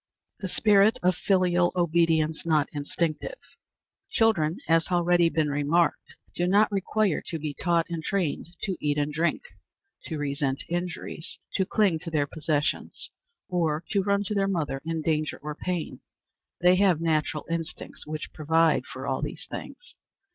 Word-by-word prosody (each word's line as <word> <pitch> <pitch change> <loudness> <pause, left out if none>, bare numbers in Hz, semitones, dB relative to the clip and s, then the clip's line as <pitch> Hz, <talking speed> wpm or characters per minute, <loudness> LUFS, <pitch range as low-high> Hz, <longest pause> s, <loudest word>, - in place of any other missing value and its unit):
The 195 - -3
Spirit 205 +2 +4
of 180 0 +3
filial 180 -2 +2
Obedience 165 -2 +2
not 155 -3 +2
Instinctive. 155 - -2 0.7
Children, 185 -7 +2
as 165 0 +3
has - - -11
already 175 -1 +4
been 155 -2 0
remarked, 145 +4 +1 0.2
do 175 - 0
not 205 +4 +4
require 200 -2 +1
to 165 - -3
be 150 -1 -4
taught 170 +3 +1
and 165 -2 -4
trained 180 -6 -1 0.2
to 195 -3 -1
eat 145 0 0
and 145 0 0
drink, 165 - 0 0.6
to 160 - -4
resent 140 -2 -1
injuries, 175 -2 -4 0.2
to 190 -2 +1
cling 195 -7 +2
to 165 - -7
their 150 -3 +1
possessions, 150 0 -2 0.4
or 165 -3 0
to 200 - +3
run 200 +1 +1
to 210 - -3
their 195 -1 +1
mother 155 -8 -1
in 165 -1 -3
danger 155 -1 0
or 150 0 -4
pain. 175 +2 -4 0.6
They 180 +1 +5
have 190 -5 +4
natural 155 -2 0
instincts 165 -2 -5
which 155 0 -5
provide 160 +1 +2
for - - -7
all - - -1
these - - -5
things. - - -8
165 Hz, 155 wpm, -27 LUFS, 155-185 Hz, 0.7 s, They